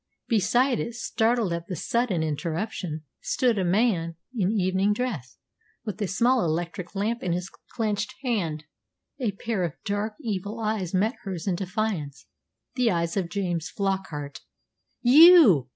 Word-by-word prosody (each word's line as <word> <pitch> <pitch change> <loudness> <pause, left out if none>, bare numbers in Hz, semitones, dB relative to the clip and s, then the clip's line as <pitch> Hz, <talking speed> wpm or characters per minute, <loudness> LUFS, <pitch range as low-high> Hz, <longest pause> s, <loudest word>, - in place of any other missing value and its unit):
Beside 240 +3 +2
it, 235 - -4
startled 225 -4 +1
at 170 0 -4
the 185 - -4
sudden 215 -3 0
interruption, 160 +1 -3 0.2
stood 240 -5 +1
a - - +1
man 180 -3 +1 0.2
in 200 -5 +1
evening 195 0 +2
dress, 205 - -4 0.5
with 210 -1 -5
a 205 - +1
small 240 +5 +2
electric 170 +2 -3
lamp 220 +4 -1
in 180 - -1
his 180 +2 -4 0.2
clenched 215 -3 -1
hand. 175 - -1 0.6
A 230 -6 -1
pair 200 -1 -2
of 165 -4 -2
dark, 205 +2 -2
evil 210 -4 -4
eyes 215 -5 -1
met 215 +6 +2
hers 190 -7 -5
in 195 - +1
defiance 180 -7 -3 0.5
the 250 -2 +2
eyes 170 -3 0
of 185 -4 -1
James 175 -4 -2
Flockart. 190 -8 -3 0.6
"You!" 255 - +8
195 Hz, 145 wpm, -26 LUFS, 170-225 Hz, 0.6 s, You